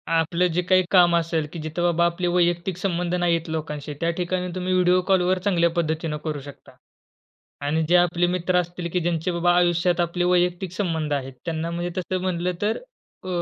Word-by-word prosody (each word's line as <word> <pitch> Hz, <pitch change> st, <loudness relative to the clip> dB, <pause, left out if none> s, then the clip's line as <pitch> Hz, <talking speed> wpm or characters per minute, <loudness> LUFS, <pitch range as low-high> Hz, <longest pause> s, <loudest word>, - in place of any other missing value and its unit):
आपलं 170 Hz, +2 st, +2 dB
जे 180 Hz, -, +2 dB
काही 185 Hz, +1 st, +3 dB
काम 175 Hz, -2 st, +6 dB
असेल, 165 Hz, -2 st, 0 dB
की 170 Hz, -, -6 dB
जिथं 155 Hz, +3 st, -3 dB
बाबा 170 Hz, 0 st, +3 dB
आपले 170 Hz, +1 st, -1 dB
वैयक्तिक 175 Hz, +1 st, +1 dB
संबंध 180 Hz, -1 st, -1 dB
नाहीयेत 170 Hz, -2 st, 0 dB
लोकांशी. 150 Hz, -2 st, -4 dB
त्या 165 Hz, -, +1 dB
ठिकाणी 180 Hz, +1 st, -1 dB
तुम्ही 185 Hz, 0 st, -1 dB
व्हिडिओ 180 Hz, 0 st, +4 dB
कॉलवर 185 Hz, -1 st, +3 dB
चांगल्या 170 Hz, -3 st, +3 dB
पद्धतीने 160 Hz, -1 st, -1 dB
करू 155 Hz, -2 st, -3 dB
शकता 140 Hz, 0 st, -13 dB, 0.9 s
आणि 160 Hz, +2 st, +1 dB
जे 180 Hz, -, +5 dB
आपले 175 Hz, 0 st, +2 dB
मित्र 180 Hz, 0 st, 0 dB
असतील 175 Hz, 0 st, -4 dB
की 180 Hz, -, +2 dB
ज्यांचे 170 Hz, +1 st, -1 dB
बाबा 175 Hz, +1 st, +2 dB
आयुष्यात 175 Hz, 0 st, +2 dB
आपले 175 Hz, +1 st, -1 dB
वैयक्तिक 180 Hz, 0 st, +1 dB
संबंध 165 Hz, -6 st, -2 dB
आहेत 135 Hz, -2 st, -3 dB
त्यांना 165 Hz, 0 st, -2 dB
म्हणजे 175 Hz, +1 st, -3 dB
तसं 185 Hz, 0 st, -2 dB
म्हटलं 180 Hz, -1 st, -1 dB
तर 210 Hz, +2 st, +1 dB, 0.5 s
अ, -, -, -9 dB
175 Hz, 185 wpm, -23 LUFS, 165-180 Hz, 0.9 s, काम